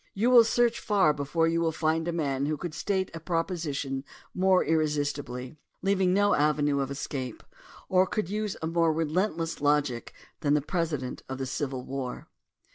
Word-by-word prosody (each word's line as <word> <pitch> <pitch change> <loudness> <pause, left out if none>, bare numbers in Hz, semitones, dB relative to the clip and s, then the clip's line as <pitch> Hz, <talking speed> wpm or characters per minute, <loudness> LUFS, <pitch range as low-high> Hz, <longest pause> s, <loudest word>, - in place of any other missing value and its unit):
You 230 +5 +2
will 240 -2 +9
search 235 +1 +2
far 195 -8 +3
before 150 +3 0
you 165 0 +1
will 165 -1 +2
find 160 +1 0
a - - +1
man 140 -4 -1
who 155 0 -1
could 170 +1 -5
state 190 +3 -1
a 165 - -6
proposition 160 -5 -2 0.3
more 185 0 +3
irresistibly, 145 -4 -1 0.3
leaving 190 -2 +2
no 205 +2 +3
avenue 145 -1 +2
of 135 -1 -1
escape, 135 -3 -5 0.4
or 185 0 +4
who - - -12
could 215 -5 -1
use 210 +1 -3
a - - 0
more 165 0 +2
relentless 165 +1 -1
logic 145 -5 +1 0.3
than 145 0 +2
the 150 - +2
President 150 -5 -2
of 130 - -4
the 135 - -3
Civil 130 -1 -3
War. 135 -2 -5
155 Hz, 175 wpm, -28 LUFS, 145-180 Hz, 0.4 s, will